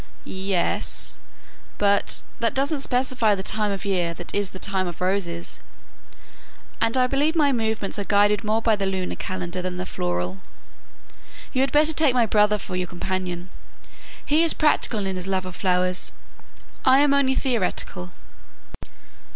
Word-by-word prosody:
"Yes; 190 -1 0 0.6
but 200 0 +2 0.2
that 230 -1 0
doesn't 280 +2 +1
specify 250 -5 +1
the 190 - -5
time 210 +1 0
of 195 -1 -5
year 175 -4 0
that 175 - -4
is 205 -1 0
the 190 - -10
time 190 -1 -1
of 175 -1 -7
roses; 180 -2 -2 1.2
and 230 +2 +2
I 255 - +4
believe 285 +5 +1
my 295 -3 +4
movements 220 -4 -2
are - - -1
guided 205 +1 +3
more 220 +1 0
by 225 -2 +4
the 200 -1 -2
lunar 190 -1 -2
calendar 185 -1 -4
than 180 0 -4
the 185 - -3
floral. 90 - -3 1.1
You 260 - +1
had 270 -1 +1
better 305 +2 +4
take 295 -5 +3
my 240 -2 +4
brother 210 -1 +3
for 190 -2 -7
your 180 0 -2
companion; 180 0 -4 0.7
he 300 +2 +3
is 330 - +4
practical 230 -8 +2
in 190 -1 -2
his 180 +1 -5
love 190 -1 -1
of 185 -1 -7
flowers, 180 -1 +1 0.7
I 260 0 +6
am 285 0 +4
only 270 -1 +3
theoretical." 190 - -2
200 Hz, 160 wpm, -23 LUFS, 185-250 Hz, 1.2 s, I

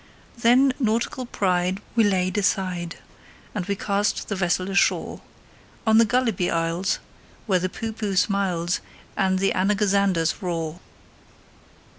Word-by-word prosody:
Then 250 +3 +4
nautical 240 +2 -1
pride 185 -3 0 0.2
we 230 - +5
laid 185 -2 +1
aside, 185 -4 -1 0.6
And 195 -5 -3
we 200 - 0
cast 200 +1 -1
the 205 - -1
vessel 185 0 0
ashore 195 - +1 0.6
On 220 0 +5
the 230 - +6
Gulliby 230 -7 +1
Isles, 170 +3 0 0.5
where 190 -4 +2
the 185 +1 -1
Poohpooh 215 -2 -4
smiles, 180 -4 +1 0.4
And 190 -1 +1
the 195 +1 +1
Anagazanders 195 -3 +1
roar. 165 -2 -3
195 Hz, 120 wpm, -24 LUFS, 180-215 Hz, 0.6 s, the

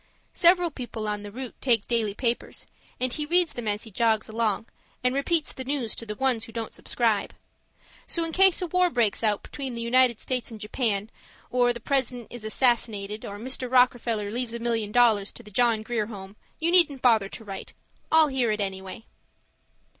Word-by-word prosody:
Several 350 -1 +4
people 240 -5 -6
on 210 0 -2
the 205 - -8
route 255 +2 -7
take 235 -5 +2
daily 220 -4 0
papers, 235 0 -2 0.3
and 255 -1 0
he 300 - -1
reads 350 0 +3
them 240 -2 -5
as 210 0 -1
he 225 - -9
jogs 220 +1 +1
along, 220 -1 -1 0.4
and 250 0 +2
repeats 300 +3 0
the 260 - -6
news 260 -4 -2
to 230 - -6
the 210 - -4
ones 250 -2 0
who 225 - -12
don't 225 -1 -5
subscribe. 225 -4 0 0.7
So 335 - -1
in 330 - -4
case 380 +1 +4
a - - 0
war 360 +1 +2
breaks 230 -7 +1
out 210 -2 +1
between 265 -4 -6
the 235 - -4
United 245 -1 +3
States 255 -2 -2
and 225 -2 -9
Japan, 210 -1 -1 0.4
or 245 -1 +3
the 235 - -5
president 250 -2 -1
is 240 -2 -8
assassinated, 215 -3 0
or 200 - -6
Mr. 255 +2 -3
Rockefeller 240 -4 +2
leaves 235 0 -2
a - - -4
million 230 -3 -1
dollars 220 -4 +3
to 235 - -11
the 210 - -13
John 230 0 +2
Grier 220 -2 -2
Home, 195 -2 -9 0.2
you 330 +2 0
needn't 315 -7 +4
bother 220 -5 +4
to 225 - -9
write; 195 -2 -8 0.4
I'll 315 -1 +6
hear 260 -4 0
it 215 0 0
anyway. 195 +2 -4
235 Hz, 195 wpm, -26 LUFS, 215-260 Hz, 0.7 s, I'll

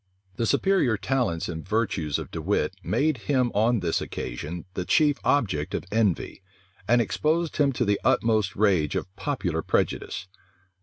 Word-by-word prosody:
The 115 - 0
superior 180 - +2
talents 105 -7 -1
and 80 -2 -5
virtues 95 -8 -1
of - - -7
De - - -4
Wit - - 0
made 155 -1 +1
him 130 -4 +2
on 110 +1 +2
this 85 -2 0
occasion 75 +8 -5
the 90 - -2
chief 145 - +3
object 95 - +1
of - - -3
envy, 105 -4 0 0.5
and 120 +2 +4
exposed 155 +8 0
him 145 -2 +3
to 120 - 0
the 100 -1 +1
utmost 110 -6 +2
rage 95 -8 +2
of 95 - -4
popular 90 - -2
prejudice. - - -1
110 Hz, 155 wpm, -26 LUFS, 90-130 Hz, 0.5 s, and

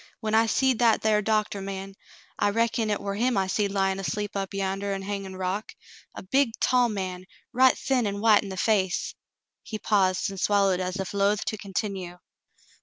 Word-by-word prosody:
When 215 -1 -3
I 225 +1 +4
seed 260 0 +2
that 230 -2 +3
thar 215 -1 +3
doc 215 0 +1
t 200 - -5
ah - - -7
man 195 0 -6 0.2
— - - -27
I 205 - +3
reckon 230 +1 0
hit 210 - 0
war 200 0 -3
him 235 +2 +1
I 190 - +2
seed 200 +2 0
lyin' 195 -1 0
asleep 205 +2 -3
up 195 -1 -3
yander 195 0 -2
on 195 - -6
Hangin' 195 -1 -5
Rock 190 +3 -3 0.2
— - - -24
a - - -7
big 235 +3 +1
tall 250 -1 +3
man, 185 -3 -4 0.3
right 260 +1 +5
thin 255 -4 0
an' 200 0 -3
white 215 -1 +5
in 200 - -7
the 190 - -6
face 190 -3 +1 0.2
— - - -62
" - - -62
he 215 - -6
paused 195 -3 +1
and 195 -2 -7
swallowed 200 -3 +3
as 185 0 -3
if 190 -1 -4
loath 200 +1 +1
to - - -2
continue. 195 -3 -4
200 Hz, 220 wpm, -26 LUFS, 195-220 Hz, 0.3 s, right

